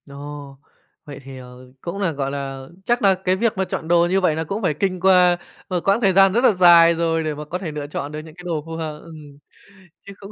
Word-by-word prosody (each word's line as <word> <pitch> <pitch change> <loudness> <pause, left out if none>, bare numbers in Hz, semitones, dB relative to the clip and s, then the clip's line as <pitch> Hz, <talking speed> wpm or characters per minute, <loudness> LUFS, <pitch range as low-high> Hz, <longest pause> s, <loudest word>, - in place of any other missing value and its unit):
Ồ, 140 0 -10 0.5
vậy 145 -2 -9
thì, 135 0 -10
ờ, 125 0 -13
cũng 175 +3 -6
là, 185 -4 +1
gọi 135 -2 -3
là, 135 -1 -6 0.2
chắc 240 +1 +1
là 195 -2 +5
cái 185 0 -1
việc 220 +1 -1
mà 190 - +1
chọn 160 - -5
đồ 170 0 +4
như 190 +2 +1
vậy 165 -4 +2
là 160 - -2
cũng 200 +7 -4
phải 180 -7 0
kinh 185 +4 -2
qua 180 -1 +4 0.3
một 180 -2 -1
quãng 200 +4 +3
thời 195 -4 +3
gian 195 0 +5
rất 240 +3 +1
là 255 - +6
dài 170 -3 +6
rồi 165 -1 0
để 155 -1 -2
mà 150 +1 -7
có 170 +4 -4
thể 180 -4 -6
lựa 150 -1 -6
chọn 145 0 -5
được 150 - -6
những 155 0 -12
cái 180 - -13
đồ 160 -4 -3
phù 165 0 -7
hợp 155 -2 -5
ừm, 150 -4 -13 0.7
chứ 200 - -9
cũng 200 +1 -10
165 Hz, 260 wpm, -21 LUFS, 145-185 Hz, 0.7 s, là